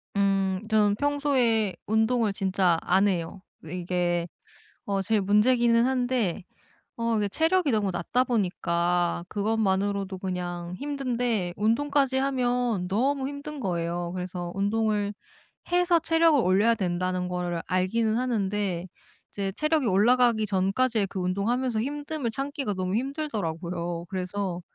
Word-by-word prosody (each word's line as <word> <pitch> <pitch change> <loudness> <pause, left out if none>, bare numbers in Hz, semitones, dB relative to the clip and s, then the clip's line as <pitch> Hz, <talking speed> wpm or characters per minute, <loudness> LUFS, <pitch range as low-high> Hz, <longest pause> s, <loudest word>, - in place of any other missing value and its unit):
음. 195 -1 +1
저는 210 -2 +3
평소에 260 -7 +1
운동을 220 0 +2
진짜 190 -3 +1
안 190 +3 +3
해요. 180 0 -2 0.2
왜 160 +3 -7
이게 175 -1 -1 0.6
어 195 -1 -1
제일 215 +1 +1
문제기는 230 +4 +4
한데 245 -8 0 0.5
어 230 -1 0
이게 205 -1 +1
체력이 325 - +2
너무 205 -3 +1
낮다 180 +8 0
보니까 175 -6 0
그것만으로도 200 -2 0
그냥 180 -2 -4
힘든데 245 -9 -1
운동까지 270 +5 +1
하면 245 -7 0
너무 265 +7 0
힘든 285 +1 -7
거예요. 175 -4 -2
그래서 180 -1 -5
운동을 205 0 0 0.6
해서 355 -1 +4
체력을 325 -2 +3
올려야 205 +4 +3
된다는 185 -1 -1
거를 175 -1 -2
알기는 215 +5 +1
하는데 205 -7 -1 0.4
이제 195 -1 -3
체력이 305 -2 +1
올라가기 230 +2 +3
전까지의 200 +3 +1
그 190 - -5
운동하면서 220 +6 0
힘듦을 290 -1 -3
참기가 275 -3 -3
너무 185 0 -2
힘들더라고요. 175 - -3
그래서 185 -1 -3
205 Hz, 300 characters per minute, -26 LUFS, 185-250 Hz, 0.6 s, 문제기는